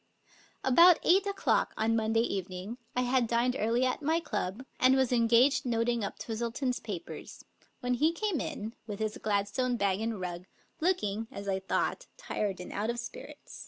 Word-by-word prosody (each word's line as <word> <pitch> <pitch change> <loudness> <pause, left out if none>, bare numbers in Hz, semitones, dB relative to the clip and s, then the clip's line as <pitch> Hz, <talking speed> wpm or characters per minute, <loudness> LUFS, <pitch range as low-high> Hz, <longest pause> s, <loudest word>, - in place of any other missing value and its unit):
About 335 +6 +7
eight 385 +4 +4
o'clock 400 0 +1
on 225 +1 +2
Monday 225 0 +2
eve"'.ng 190 +2 -4 0.2
I 250 - +2
had 250 -1 +2
dined 240 +2 +1
early 235 +4 +2
at 255 - -1
my 320 +3 +2
club, 225 - -3
and 255 +1 +5
was 265 -2 +2
engaged 245 +4 +4
noting 235 -2 0
up 200 - -4
Twistle 230 +1 -3
ton's 250 0 -1
papers, 200 -6 -8 0.4
when 250 0 0
he 300 +7 +3
came 360 -3 -1
in, 220 +2 -5
with 205 -2 -5
hi' 215 -1 -2
Gladstone 215 +5 0
bag 200 -1 +1
and 225 -2 -2
rug, 180 -1 -5 0.3
looking, 225 - 0
as 200 - -7
I 190 -1 0
thought, 335 - -1
tired 210 - -3
and 180 - -7
out 210 +3 -1
of 235 - -1
spirits. 235 0 -9
235 Hz, 175 wpm, -30 LUFS, 210-260 Hz, 0.4 s, About